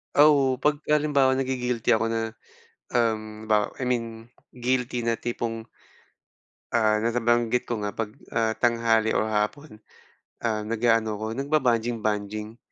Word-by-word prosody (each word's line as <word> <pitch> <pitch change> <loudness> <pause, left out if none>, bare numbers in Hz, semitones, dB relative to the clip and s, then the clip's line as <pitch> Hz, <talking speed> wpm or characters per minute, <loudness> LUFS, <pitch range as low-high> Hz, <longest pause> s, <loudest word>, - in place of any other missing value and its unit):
Oo, 145 -3 +5
'pag 145 +3 +1
halimbawa 145 -3 +3
nagi-guilty 125 -3 -1
ako 115 0 +3
na, 115 0 -1 0.7
um, 110 -2 -1
halimbawa, 105 -1 +2
I 130 - -2
mean 120 -2 +1 0.5
guilty 125 -1 -1
na 115 - +2
tipong 115 -1 -4 1.1
ah, 110 -2 +3
na 115 +2 -1
nabanggit 120 0 +2
ko 120 -3 -3
nga 105 -1 -4
'pag, 110 -2 -3 0.2
ah, 115 -1 0
tanghali 115 -2 +2
o - - +2
hapon, 110 +4 -2 0.6
ah, 105 -2 -1
nag-aano 115 -1 +1
ako 110 +1 -4
nagbabanjing-banjing, 115 -6 -1
115 Hz, 125 wpm, -25 LUFS, 110-125 Hz, 1.1 s, Oo